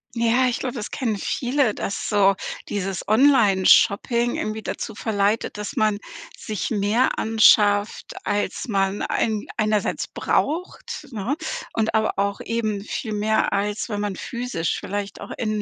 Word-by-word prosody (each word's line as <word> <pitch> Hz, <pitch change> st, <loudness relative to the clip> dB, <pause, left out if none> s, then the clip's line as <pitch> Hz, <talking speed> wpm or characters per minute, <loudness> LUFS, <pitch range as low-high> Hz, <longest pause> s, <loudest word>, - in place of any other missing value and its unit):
Ja, 235 Hz, +2 st, +3 dB
ich 245 Hz, -, 0 dB
glaub, 255 Hz, -1 st, -3 dB
das 230 Hz, -5 st, -5 dB
kennen 225 Hz, -5 st, -2 dB
viele, 250 Hz, -1 st, 0 dB
dass 200 Hz, -, -3 dB
so 200 Hz, -2 st, +4 dB, 0.3 s
dieses 195 Hz, -2 st, -3 dB
Onlineshopping 235 Hz, -1 st, +4 dB
irgendwie 215 Hz, 0 st, -3 dB
dazu -, -, -5 dB
verleitet, 210 Hz, -1 st, 0 dB
dass 210 Hz, -, -5 dB
man 215 Hz, -1 st, +2 dB, 0.4 s
sich 215 Hz, 0 st, -4 dB
mehr 215 Hz, +4 st, +1 dB
anschafft, 210 Hz, -1 st, +3 dB
als 205 Hz, +5 st, -2 dB
man 195 Hz, -1 st, 0 dB
ein 215 Hz, -2 st, -1 dB
einerseits 215 Hz, -2 st, 0 dB
braucht, 310 Hz, -1 st, -2 dB
ne? 230 Hz, +6 st, -2 dB, 0.4 s
Und 225 Hz, -1 st, 0 dB
aber 220 Hz, 0 st, +1 dB
auch 200 Hz, 0 st, 0 dB
eben 215 Hz, -3 st, -2 dB
viel 220 Hz, 0 st, -4 dB
mehr, 220 Hz, +1 st, +1 dB
als 205 Hz, +3 st, -1 dB
wenn 205 Hz, -2 st, -3 dB
man 205 Hz, -2 st, -2 dB
physisch 235 Hz, -9 st, -3 dB
vielleicht 200 Hz, 0 st, -5 dB
auch -, -, -8 dB
in 215 Hz, -2 st, -1 dB
215 Hz, 140 wpm, -23 LUFS, 205-235 Hz, 0.4 s, so